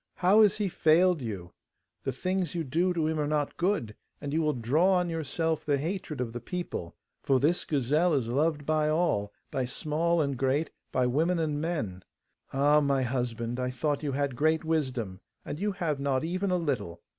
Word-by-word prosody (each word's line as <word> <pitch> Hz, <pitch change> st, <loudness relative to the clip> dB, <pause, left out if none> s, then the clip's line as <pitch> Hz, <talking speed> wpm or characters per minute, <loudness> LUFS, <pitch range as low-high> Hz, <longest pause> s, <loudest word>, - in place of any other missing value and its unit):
How 195 Hz, +4 st, +5 dB
has 210 Hz, -3 st, +5 dB
he 210 Hz, -2 st, 0 dB
failed 170 Hz, 0 st, +3 dB
you? 95 Hz, -7 st, -5 dB, 0.5 s
The 135 Hz, -, -2 dB
things 185 Hz, +5 st, -2 dB
you 170 Hz, -, -1 dB
do 165 Hz, +7 st, +1 dB
to 165 Hz, -3 st, 0 dB
him 160 Hz, 0 st, 0 dB
are 150 Hz, -, 0 dB
not 150 Hz, -1 st, -1 dB
good, 170 Hz, -, 0 dB, 0.2 s
and 145 Hz, -1 st, -5 dB
you 160 Hz, -, +2 dB
will 155 Hz, -1 st, +2 dB
draw 150 Hz, +11 st, +3 dB
on 180 Hz, -2 st, +1 dB
yourself 160 Hz, 0 st, -1 dB
the 145 Hz, -2 st, +1 dB
hatred 160 Hz, -1 st, -4 dB
of 120 Hz, -2 st, -3 dB
the 120 Hz, -, -4 dB
people. 145 Hz, -, -5 dB, 0.3 s
For 135 Hz, -1 st, +2 dB
this 160 Hz, +6 st, +1 dB
gazelle 150 Hz, +4 st, +2 dB
is 130 Hz, -5 st, 0 dB
loved 145 Hz, +4 st, 0 dB
by 155 Hz, 0 st, +2 dB
all, 155 Hz, -11 st, +1 dB, 0.2 s
by 130 Hz, -2 st, -1 dB
small 160 Hz, +6 st, 0 dB
and 140 Hz, -3 st, 0 dB
great, 135 Hz, +5 st, 0 dB, 0.2 s
by 130 Hz, -, +2 dB
women 160 Hz, +8 st, +2 dB
and 150 Hz, -3 st, -1 dB
men. 115 Hz, -, -2 dB, 0.5 s
Ah, 145 Hz, +2 st, +4 dB
my 140 Hz, -2 st, +2 dB
husband! 120 Hz, -1 st, -2 dB
I 125 Hz, 0 st, -1 dB
thought 145 Hz, +3 st, -1 dB
you 145 Hz, -3 st, -2 dB
had 140 Hz, -1 st, -1 dB
great 155 Hz, +4 st, +2 dB
wisdom, 130 Hz, -12 st, -1 dB, 0.3 s
and 150 Hz, -, -5 dB
you 205 Hz, +2 st, 0 dB
have 155 Hz, -6 st, -2 dB
not 140 Hz, -1 st, 0 dB
even 185 Hz, +4 st, -1 dB
a 180 Hz, -, +2 dB
little! 105 Hz, -, -3 dB
150 Hz, 195 wpm, -29 LUFS, 130-165 Hz, 0.5 s, How